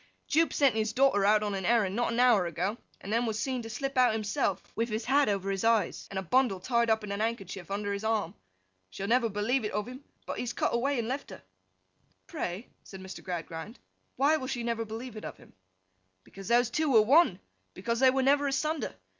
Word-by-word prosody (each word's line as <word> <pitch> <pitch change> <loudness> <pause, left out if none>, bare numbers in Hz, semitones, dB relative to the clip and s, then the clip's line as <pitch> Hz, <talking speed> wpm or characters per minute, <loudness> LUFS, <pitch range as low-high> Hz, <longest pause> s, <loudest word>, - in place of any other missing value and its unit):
'Jupe 330 +2 +2
sent 280 -3 +3
his 220 0 -1
daughter 260 -6 +3
out 215 0 +4
on 205 -1 -2
an 195 -1 -3
errand 205 -2 +2
not 240 0 0
an 230 - -1
hour 235 -8 +4
ago, 175 +6 -2 0.3
and 205 - -5
then 235 +1 +1
was 220 -1 -2
seen 260 +1 -2
to 225 - -8
slip 275 +5 -4
out 250 -3 +5
himself, 205 -3 -1
with 230 +1 -1
his 220 +1 -3
hat 275 0 +3
over 195 -1 -1
his 195 -1 -2
eyes, 225 -5 +1
and 195 - -6
a 190 - -2
bundle 240 -1 +2
tied 235 +3 +1
up 220 -1 +2
in 205 - -5
a 200 - -2
handkerchief 200 -5 -4
under 200 0 -2
his 200 +1 -4
arm. 220 -1 0 0.6
She 190 - -7
will 200 - -3
never 235 -1 +3
believe 220 +5 0
it 210 - -3
of 210 +2 -2
him, 255 +3 -9 0.2
but - - -5
he - - -2
has 245 -1 -3
cut - - -1
away 270 +4 +1
and 230 -2 -2
left 265 +3 -4
her.' - - -11 0.8
'Pray,' 220 - -5 0.2
said 190 - -11
Mr. 190 0 -9
Gradgrind, 175 +4 -6 0.4
'why 295 +3 +3
will 260 -4 -5
she 240 -2 -3
never 230 -1 -2
believe 225 +3 -7
it 215 - -8
of - - -7
him?' - - -19 0.7
'Because 195 -1 -11
those 240 +1 +3
two 310 +3 0
were 220 -4 +6
one. 295 +10 +4 0.4
Because 235 -1 -2
they 260 0 +6
were 265 +1 +1
never 285 +1 +3
asunder. 295 0 -1
225 Hz, 230 wpm, -29 LUFS, 205-255 Hz, 0.8 s, were